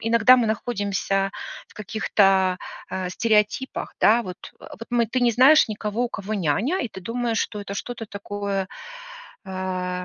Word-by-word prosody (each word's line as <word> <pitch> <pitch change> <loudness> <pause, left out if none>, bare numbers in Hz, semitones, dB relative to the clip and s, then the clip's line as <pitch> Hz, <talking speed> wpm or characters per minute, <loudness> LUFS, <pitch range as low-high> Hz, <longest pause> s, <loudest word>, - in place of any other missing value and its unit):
иногда 230 +2 +5
мы 240 -2 +2
находимся 200 -3 -1 0.4
в - - -21
каких-то, 195 -3 +2 0.3
а, 185 -1 -3
стереотипах, 210 +5 0
да 230 +3 +5
вот. 185 -4 -7 0.2
Э, - - -12
вот 230 - -8
мы 240 -1 +2
ты 255 +4 -1
не 245 -1 +4
знаешь 265 +6 +6
никого, 215 +2 -2
у - - -2
кого 205 0 -4
няня, 205 - 0
и 245 - -3
ты 190 - -10
думаешь, 230 +3 -2
что 210 - -2
это 200 -1 -7
что-то 235 +3 -5
такое, 200 -2 -4 0.8
э, 185 -1 -3
210 Hz, 160 wpm, -24 LUFS, 195-230 Hz, 0.8 s, знаешь